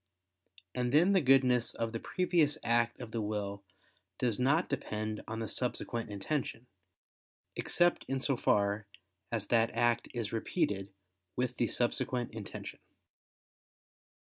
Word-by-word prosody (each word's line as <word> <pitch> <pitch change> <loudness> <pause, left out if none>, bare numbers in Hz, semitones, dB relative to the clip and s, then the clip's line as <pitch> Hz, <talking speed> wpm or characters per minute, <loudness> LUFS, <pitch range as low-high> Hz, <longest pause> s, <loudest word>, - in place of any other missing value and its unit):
And 125 -1 -1
then 170 +8 +5
the 190 - +5
goodness 130 -3 +4
of 115 -1 -2
the 115 - -3
previous 170 -4 +2
act 120 0 +2
of 110 - -7
the 115 - -2
will 100 -1 -3 0.5
does 120 -3 0
not 140 +7 +3
depend 110 -6 -3
on 110 - -4
the 110 -1 -3
subsequent 120 -1 -2
intention, 115 +4 -3 0.9
except 175 0 +2
in 135 0 -1
so 135 +1 +1
far 105 -2 +1 0.4
as 110 -4 -1
that 115 -1 +4
act 120 0 +2
is 115 -4 -3
repeated 100 -3 -1 0.4
with 125 0 -1
the 120 - +2
subsequent 120 +1 0
intention. - - -7
120 Hz, 130 wpm, -32 LUFS, 110-130 Hz, 0.9 s, then